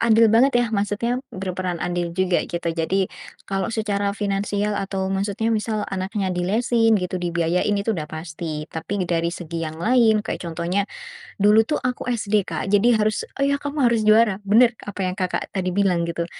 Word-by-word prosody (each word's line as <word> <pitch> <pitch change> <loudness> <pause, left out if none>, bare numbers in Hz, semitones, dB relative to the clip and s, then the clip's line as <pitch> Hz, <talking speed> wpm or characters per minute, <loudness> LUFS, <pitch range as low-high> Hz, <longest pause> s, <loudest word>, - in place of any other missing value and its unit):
andil 225 0 +5
banget 255 +5 +5
ya, 240 - +1
maksudnya 215 +4 0
berperan 185 -3 -3
andil 175 -1 -2
juga 185 -1 +2
gitu. 170 0 -3
Jadi 180 +4 0 0.4
kalau 195 -1 -1
secara 205 -2 -1
finansial 205 0 -1
atau 195 -1 -2
maksudnya 205 +3 -1
misal 215 -1 -1
anaknya 195 +1 -2
dilesin 225 +5 +2
gitu, 180 0 -3
dibiayain 170 +3 0
itu 205 +3 0
udah 155 - -3
pasti. 155 -1 -5
Tapi 180 +4 -3
dari 170 -1 +1
segi 170 -1 -5
yang 155 - -9
lain, 225 0 +4
kayak - - -4
contohnya, 170 +4 -1 0.6
dulu 210 +2 +6
tuh 300 - 0
aku 255 -1 -2
SD, 215 -3 +1
Kak, - - -4
jadi 225 +3 +5
harus, 215 0 0
"Oh, 275 - +2
ya, 280 0 +2
kamu 285 -1 0
harus 230 -2 +1
juara!" 215 -2 +5
Benar 230 +4 +5
apa 205 -1 -8
yang 180 - -1
Kakak 185 -2 -2
tadi 185 -2 -1
bilang, 180 -4 +2
gitu. 170 0 -2
200 Hz, 175 wpm, -22 LUFS, 180-220 Hz, 0.6 s, dulu